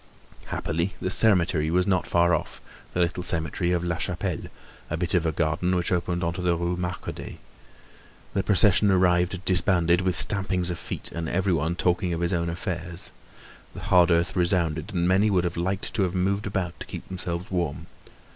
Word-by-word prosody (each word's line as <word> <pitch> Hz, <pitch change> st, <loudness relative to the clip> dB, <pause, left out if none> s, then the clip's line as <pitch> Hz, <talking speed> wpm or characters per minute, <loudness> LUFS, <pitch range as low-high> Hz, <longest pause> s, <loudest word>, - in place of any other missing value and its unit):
Happily, 85 Hz, +4 st, -2 dB
the 90 Hz, -, -2 dB
cemetery 90 Hz, -7 st, +3 dB
was 90 Hz, +2 st, +2 dB
not 95 Hz, -3 st, +1 dB
far 85 Hz, 0 st, +3 dB
off, 80 Hz, -, -2 dB, 0.4 s
the -, -, 0 dB
little 90 Hz, +1 st, 0 dB
cemetery 85 Hz, 0 st, 0 dB
of 90 Hz, -1 st, 0 dB
La 85 Hz, -1 st, -1 dB
Chapelle, 90 Hz, 0 st, -3 dB, 0.4 s
a 80 Hz, -, -2 dB
bit 85 Hz, 0 st, -1 dB
of 85 Hz, -3 st, +2 dB
a -, -, +1 dB
garden 80 Hz, +3 st, 0 dB
which 90 Hz, -1 st, 0 dB
opened 90 Hz, 0 st, -1 dB
on 85 Hz, 0 st, 0 dB
to 90 Hz, -, -5 dB
the 90 Hz, -1 st, +2 dB
Rue 85 Hz, +1 st, -1 dB
Marcadet. 90 Hz, +1 st, -5 dB, 1.0 s
The 100 Hz, -, +1 dB
procession 100 Hz, +1 st, +4 dB
arrived 90 Hz, 0 st, +2 dB
disbanded, 90 Hz, -1 st, +3 dB
with 95 Hz, -1 st, 0 dB
stampings 95 Hz, -1 st, +2 dB
of 85 Hz, -, -5 dB
feet -, -, -6 dB
and 85 Hz, -1 st, -4 dB
everybody 85 Hz, -3 st, 0 dB
talking 90 Hz, 0 st, 0 dB
of 85 Hz, -, -4 dB
his 85 Hz, +1 st, +1 dB
own 85 Hz, -1 st, 0 dB
affairs. 85 Hz, 0 st, -3 dB, 0.6 s
The -, -, -7 dB
hard 90 Hz, -1 st, +4 dB
earth 85 Hz, +1 st, +2 dB
resounded, 85 Hz, -1 st, 0 dB
and 90 Hz, -3 st, 0 dB
many 95 Hz, +4 st, +3 dB
would 90 Hz, -4 st, +2 dB
have 85 Hz, -1 st, -2 dB
liked 95 Hz, +3 st, -2 dB
to 110 Hz, -, 0 dB
have 95 Hz, -1 st, 0 dB
moved 100 Hz, +4 st, 0 dB
about 95 Hz, -4 st, -3 dB
to -, -, -8 dB
keep -, -, -8 dB
themselves 90 Hz, -1 st, -4 dB
warm. 85 Hz, -3 st, -2 dB
90 Hz, 185 wpm, -25 LUFS, 85-95 Hz, 1.0 s, procession